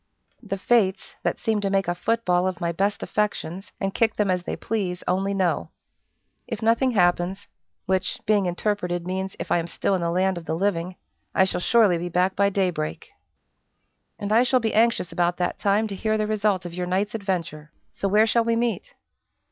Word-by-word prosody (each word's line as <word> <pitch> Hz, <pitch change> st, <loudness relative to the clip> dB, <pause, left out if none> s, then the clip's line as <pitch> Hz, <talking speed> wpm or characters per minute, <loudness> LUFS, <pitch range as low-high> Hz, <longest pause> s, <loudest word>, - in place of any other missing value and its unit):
"The 200 Hz, -4 st, -4 dB
Fates, 195 Hz, -2 st, +1 dB
that -, -, -1 dB
seem 220 Hz, -3 st, 0 dB
to 200 Hz, -, 0 dB
make 195 Hz, -2 st, +1 dB
a 175 Hz, -, +1 dB
foot 230 Hz, +6 st, -1 dB
ball 180 Hz, 0 st, +2 dB
of 185 Hz, -2 st, -3 dB
my 170 Hz, 0 st, -1 dB
best 200 Hz, +4 st, -1 dB
affections, 195 Hz, -3 st, -2 dB
and 195 Hz, 0 st, -2 dB
kick 225 Hz, -2 st, +2 dB
them 205 Hz, -3 st, +1 dB
as 180 Hz, -1 st, 0 dB
they -, -, -4 dB
please, 190 Hz, -5 st, -3 dB
only 195 Hz, +2 st, 0 dB
know. 185 Hz, -3 st, 0 dB, 0.8 s
If 230 Hz, -2 st, -5 dB
nothing 230 Hz, +4 st, +3 dB
happens 180 Hz, 0 st, +1 dB, 0.4 s
which, 190 Hz, -1 st, 0 dB
being 205 Hz, -3 st, +3 dB
interpreted, 175 Hz, -1 st, -1 dB
means, 190 Hz, +1 st, -3 dB
if -, -, -6 dB
I -, -, +4 dB
am 165 Hz, -, -3 dB
still 195 Hz, -, -1 dB
in 185 Hz, -, 0 dB
the 170 Hz, -, 0 dB
land 185 Hz, +1 st, +1 dB
of 165 Hz, -, -14 dB
the 160 Hz, -, -2 dB
living 180 Hz, -1 st, -1 dB, 0.4 s
I 190 Hz, -, +5 dB
shall 190 Hz, -1 st, -1 dB
surely 205 Hz, -5 st, +4 dB
be 175 Hz, +1 st, -4 dB
back 180 Hz, +2 st, +1 dB
by 200 Hz, 0 st, +3 dB
daybreak." 180 Hz, -6 st, -2 dB, 1.1 s
"And 205 Hz, 0 st, -4 dB
I 225 Hz, +2 st, +6 dB
shall 255 Hz, +1 st, +3 dB
be 225 Hz, -2 st, -1 dB
anxious 225 Hz, -5 st, +2 dB
about 175 Hz, 0 st, 0 dB
that 180 Hz, -1 st, -2 dB
time 205 Hz, +2 st, +2 dB
to 200 Hz, -, -4 dB
hear 215 Hz, +3 st, 0 dB
the 215 Hz, -, 0 dB
result 210 Hz, -3 st, 0 dB
of 175 Hz, -, -6 dB
your 180 Hz, 0 st, -3 dB
night's 195 Hz, +3 st, 0 dB
adventure; 170 Hz, -7 st, -3 dB, 0.2 s
so 200 Hz, -, -2 dB
where 210 Hz, +3 st, +4 dB
shall 230 Hz, +1 st, +2 dB
we 230 Hz, 0 st, +1 dB
meet?" 240 Hz, -, -2 dB
195 Hz, 205 wpm, -24 LUFS, 180-215 Hz, 1.1 s, I